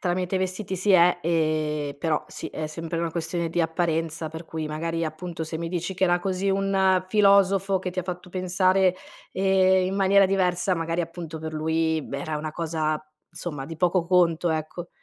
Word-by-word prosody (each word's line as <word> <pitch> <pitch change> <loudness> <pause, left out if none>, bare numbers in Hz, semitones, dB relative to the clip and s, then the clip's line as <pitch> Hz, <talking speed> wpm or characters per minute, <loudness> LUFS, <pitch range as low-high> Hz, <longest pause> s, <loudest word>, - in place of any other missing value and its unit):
tramite 180 +1 -1
i - - +2
vestiti 190 +1 -3
si 200 +3 0
è 175 -1 +6
ehm 155 -2 +1 0.3
però 155 0 0
sì, - - -7
è 155 - -4
sempre 165 +2 -5
una 170 -1 -1
questione 170 0 -2
di 175 +1 -1
apparenza, 165 -1 -1
per 160 +2 -8
cui 160 -1 -5
magari 165 +2 -2
appunto 160 +1 -5
se 160 0 -5
mi 165 0 -4
dici, 175 +2 -3
che 185 - -5
era 175 0 +3
così 190 +1 -1
un 190 -1 +2
filosofo, 195 -1 +4
che 180 0 -4
ti 185 - -7
ha - - -7
fatto 180 0 -6
pensare, 185 +1 +2 0.4
ehm, 190 -1 +3
in 190 - -2
maniera 195 0 +5
diversa, 185 -1 +1
magari 165 +1 -1
appunto, 165 -1 -6
per 160 0 -6
lui, 160 0 0
b - - -11
era 150 +2 -3
una 155 +1 -4
cosa 155 -1 -2 0.3
insomma 165 -5 -6
di 165 +1 -7
poco 180 0 +2
conto, 175 -1 +3
ecco. 160 +2 -4
175 Hz, 190 wpm, -25 LUFS, 160-185 Hz, 0.4 s, è